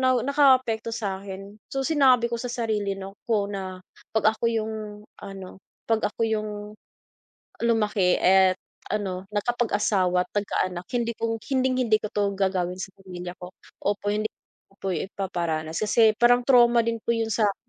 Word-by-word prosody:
nakaapekto 255 -3 +3
sa'kin. 195 -1 -6
So 270 0 -1
sinabi 260 -6 +4
ko - - +1
sa 245 - -4
sarili 215 -5 -1
'no 195 +1 -8
ko 205 -3 +1
na 190 -2 -5 0.3
pag 220 0 +3
ako 220 - -6
yung 220 -1 -1 0.5
ano 195 -2 -9 0.3
'pag 225 -2 +2
ako - - -16
yung, 215 -1 -1 1.1
lumaki 210 -5 +2
at 190 0 +5 0.4
ano 190 -3 -2
nagkapag-asawa't 205 -5 +1
nagka-anak, 185 -3 -1
hindi 235 -1 0
kong 225 -1 -2
hinding-hindi 255 -4 +1
ko - - -2
'to 205 -1 +1
gagawin 185 -2 0
sa 195 - -6
pamilya 180 -2 -7
ko 180 - -8 0.3
opo, 205 0 -1
hindi 215 +1 0 0.4
ko - - -25
po, 195 - -3
ipaparanas. 170 -3 -3
Kasi, 220 +1 +5
parang 240 +2 +5
trauma 240 -2 +6
din 230 0 0
po - - -2
yung 225 -1 -1
sa'kin 205 -2 0
210 Hz, 145 wpm, -25 LUFS, 190-235 Hz, 1.1 s, trauma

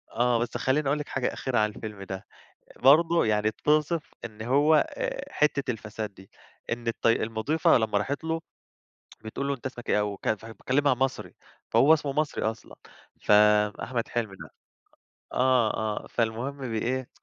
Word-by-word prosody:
آه 120 0 +2
بس 120 - -2
خلّيني 135 +2 +1
أقول 150 +2 +1
لِك 150 - -5
حاجة 130 -2 -1
أخيرة 125 -4 -1
عن 105 0 +2
الفيلم 105 -2 -8
ده، 95 0 -6 0.5
برضه 165 +5 +5
يعني 105 0 +2
بتوصِف 150 +6 0
إن 110 -1 -7
هو 145 +5 +4
آآ - - -5
حتّة 140 -3 +1
الفساد 110 -2 -5
دي، 95 +1 -16 0.4
إن 120 0 -3
الط 115 - -2
المضيفة 115 +7 +2
لما 110 -2 +1
راحت 140 +9 -3
له 165 0 -1 0.9
بتقول 140 +5 -4
له: 140 - +1
"أنت 125 - -20
اسمك 125 -2 -6
إيه" 105 - +3
وك 100 -1 -3
فكلمها 115 +6 0
مصري، 135 +1 -2 0.3
فهو 155 +3 +6
اسمه 145 -3 0
مصري 155 0 -1
أصلًا، 110 -1 -4 0.5
فـأحمد 105 +3 +3
حلمي 110 -5 -3
ده - - -10 0.9
آه 125 -3 +3 0.3
آه - - -13
فالمُهم 120 +5 -2
بإيه 125 +3 -2
120 Hz, 155 wpm, -27 LUFS, 110-140 Hz, 0.9 s, فهو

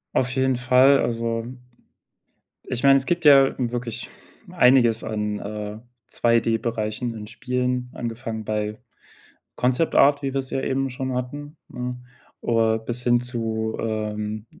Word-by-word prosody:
Auf 125 -1 +1
jeden 130 0 +1
Fall, 130 +3 +5
also 115 -1 -2 1.2
ich 125 +2 -3
meine, 135 0 +7
es 135 - -2
gibt 175 0 -1
ja 135 -2 +7
wirklich 120 -1 -3 0.4
einiges 125 -8 +4
an, 105 -1 -3
äh, 105 0 -6 0.3
2D-Bereichen 115 0 0
in 105 -2 -8
Spielen 125 +1 -2
angefangen 115 -2 -5
bei 105 0 -2 0.8
Concept 130 +6 +1
Art, 145 +1 +5
wie 135 -1 -2
wir 135 - 0
es 130 -1 -4
ja 135 - -1
eben 135 0 -1
schon 130 0 -4
hatten, 145 +5 -5
ne? 125 0 -5 0.4
Oder 115 -1 +2
bis 120 +2 -4
hin 120 0 +3
zu, 110 -2 -2
ähm, 105 -1 -3
120 Hz, 135 wpm, -23 LUFS, 110-130 Hz, 1.2 s, meine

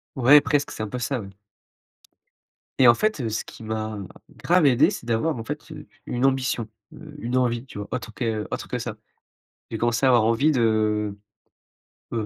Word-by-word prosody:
Ouais, 135 +3 +7
presque, 145 0 0
c'est - - -6
un 110 - -3
peu 125 - -5
ça, 130 +1 -2
ouais. 100 - -8 1.5
Et 130 - +7
en 120 - +8
fait, 215 - 0
heu, 115 - -2
ce 110 - -3
qui - - -12
m'a 110 -1 -4 0.5
grave 175 -2 +4
aidé 140 +5 +5
c'est 155 - -7
d'avoir 120 +5 0
en 115 - -5
fait, - - -7
heu, - - -10 0.2
une 125 +2 -1
ambition. 130 -4 0 0.3
Heu, 150 -2 -12
une 125 -1 -1
envie 120 0 0
tu 115 - -11
vois? 105 - -5
Autre 125 -3 -5
que 110 -2 -2
autre - - -4
que - - -3
ça. - - -5 0.7
J'ai 110 - -3
commencé 120 +2 +1
à - - +5
avoir 120 -3 +5
envie 115 +7 +3
de, 110 -4 +1 1.0
heu, 115 -2 -1
120 Hz, 195 wpm, -24 LUFS, 110-135 Hz, 1.5 s, en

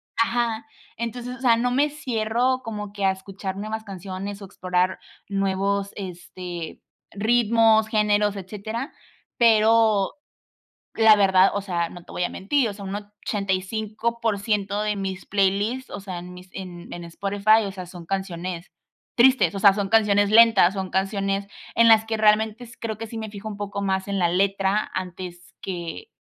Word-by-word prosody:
Ajá, 230 -1 0 0.3
entonces, 240 +2 -5
o - - -16
sea, 235 -3 +4
no 245 +1 +1
me 285 +4 +2
cierro 250 -2 0
como 210 -3 -6
que 200 -1 -5
a 195 - +4
escuchar 190 0 -6
nuevas 215 +2 -4
canciones, 195 0 -6
o, - - -7
explorar 185 -1 -1 0.3
nuevos, 195 0 0
este, 180 -3 -7 0.3
ritmos, 225 0 +3
géneros, 210 -2 +2
etcétera. 215 +6 -6 0.4
Pero, 220 -3 +4 0.8
la 220 -1 +6
verdad, 190 -1 +5
o 200 - 0
sea, 175 -4 -2
no 175 -1 -12
te - - -12
voy 180 - -1
a - - 0
mentir, 235 +5 0
o - - -6
sea, 200 -1 -9
un 195 - -4
85% 210 +1 -2
de 210 0 0
mis 190 -1 -4
playlists, 205 +6 0
o - - -5
sea, 190 -3 -6
en 180 +1 -10
mis 180 +1 -12
en 180 -2 -8
en 175 - -7
Spotify, 200 +5 +2
o - - -5
sea, 185 -1 -7
son 175 -1 -11
canciones 185 -2 -4 0.4
tristes, 255 -3 +4
o - - -2
sea, 200 0 +7
son 200 -1 -2
canciones 205 -2 +4
lentas, 220 -4 +6
son 190 -2 -4
canciones 195 +1 -1 0.3
en 230 0 +6
las 220 0 +6
que 225 - -2
realmente 220 +2 +2
creo 220 -2 -4
que 225 +1 -6
sí 225 - -7
me 220 -1 -5
fijo 205 +1 -7
un 205 - -7
poco 200 0 -4
más 190 -1 -1
en 200 -1 -1
la 175 - +3
letra 195 +3 +1
antes 180 -1 -6
que 180 - -6
200 Hz, 165 wpm, -24 LUFS, 190-220 Hz, 0.8 s, sea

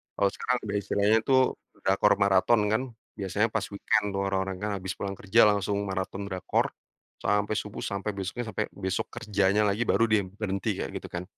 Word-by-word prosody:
Kalau 100 - +3
sekarang 125 +1 -1
udah 100 -1 -1
istilahnya 100 +2 +3
tuh 130 -1 +5 0.4
drakor - - +4
maraton, 100 +3 +4
kan? 110 - +2 0.4
Biasanya 100 +3 +1
pas - - -1
weekend 100 +1 +1
tuh 100 - 0
orang-orang 95 -1 -1
kan, 105 - 0
habis 95 0 -4
pulang 100 -1 -4
kerja 110 +4 +3
langsung 100 0 0
maraton 95 0 -3
drakor 95 -1 0 0.5
sampai 105 +1 +1
subuh, 105 0 -5
sampai 100 +1 -2
besoknya, 100 +5 -4
sampai 105 - -1
besok 95 -1 -2
kerjanya 105 -3 +1
lagi, 100 +4 +1
baru 115 - +3
dia 110 -1 +3
berhenti, 100 0 -3
kayak - - -3
gitu, - - -6
kan. 90 0 -4
100 Hz, 180 wpm, -28 LUFS, 95-105 Hz, 0.5 s, tuh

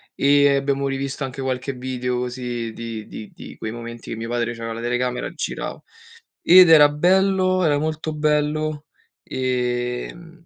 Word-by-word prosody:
e 140 0 +4
abbiamo 140 0 0
rivisto 135 +1 -3
anche 135 +1 -7
qualche 130 +1 -2
video 125 -1 -3
così 125 -2 -4
di 115 -1 -7
di 105 - -9
di - - -11
quei 110 +1 -5
momenti 115 0 -9
che - - -3
mio 115 +1 -6
padre 120 -1 -1
c'aveva 115 -1 -6
la - - -6
telecamera 125 +1 -1
e - - -10
girava. - - -5 0.6
Ed 180 0 +8
era 150 -2 +8
bello, 185 +3 +2
era 145 -2 +3
molto 155 +1 -3
bello, 150 0 0 0.4
ehm, 125 +6 -3
135 Hz, 155 wpm, -22 LUFS, 120-150 Hz, 0.6 s, Ed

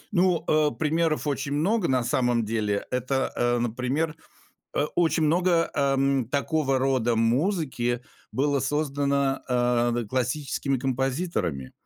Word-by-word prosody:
Ну, 175 -2 +2
э, 155 -1 +3
примеров 160 0 0
очень 140 0 -2
много, 180 +6 +1
на 130 -2 +1
самом 120 -2 +1
деле. 105 -2 -1
Это, 130 +2 -1
э, 120 0 +1
например, 125 +7 -1 0.6
э, - - +2
очень 165 -1 +2
много, 170 +1 +2
эм, 135 -3 +1
такого 140 0 +1
рода 130 -3 +1
музыки 120 - 0 0.3
было 140 0 +1
создано, 140 -1 0
э, 120 -1 +2
да, 120 -1 -1
классическими 130 +2 -1
композиторами. 130 - -2
135 Hz, 120 wpm, -26 LUFS, 120-155 Hz, 0.6 s, э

